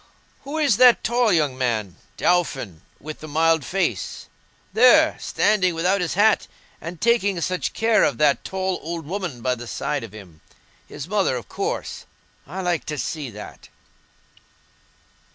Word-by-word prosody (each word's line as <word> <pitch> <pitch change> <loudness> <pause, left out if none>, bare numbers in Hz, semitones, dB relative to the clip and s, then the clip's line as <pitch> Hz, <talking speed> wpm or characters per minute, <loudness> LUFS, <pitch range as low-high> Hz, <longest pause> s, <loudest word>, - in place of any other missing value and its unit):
Who 290 +3 -4
is 285 -9 +2
that 250 -1 +6
tall 240 -1 +2
young 150 -7 +1
man, 115 -8 -2 0.2
Dauphin, 135 - 0 0.2
with 155 +2 -8
the 155 - -9
mild 160 0 +2
face? 195 +6 -2 0.5
There, 310 +7 +6
standing 190 -5 +1
without 180 +4 +1
his 175 -1 -2
hat, 210 +2 +3 0.3
and 170 0 -7
taking 205 -6 +2
such 185 +2 -2
care 225 0 +3
of - - +1
that 145 -4 +2
tall 190 -1 -2
old 165 -1 -5
woman 175 -7 -5
by 130 - +1
the 120 -1 -8
side 140 +4 -3
of 115 - -9
him—his 100 - -13
mother, 195 -8 +1
of 120 -6 -6
course. - - -4 0.4
I 185 +6 -5
like 175 -3 -1
to 150 - -3
see 145 +1 -4
that." 105 -1 -11
170 Hz, 150 wpm, -22 LUFS, 135-200 Hz, 0.5 s, that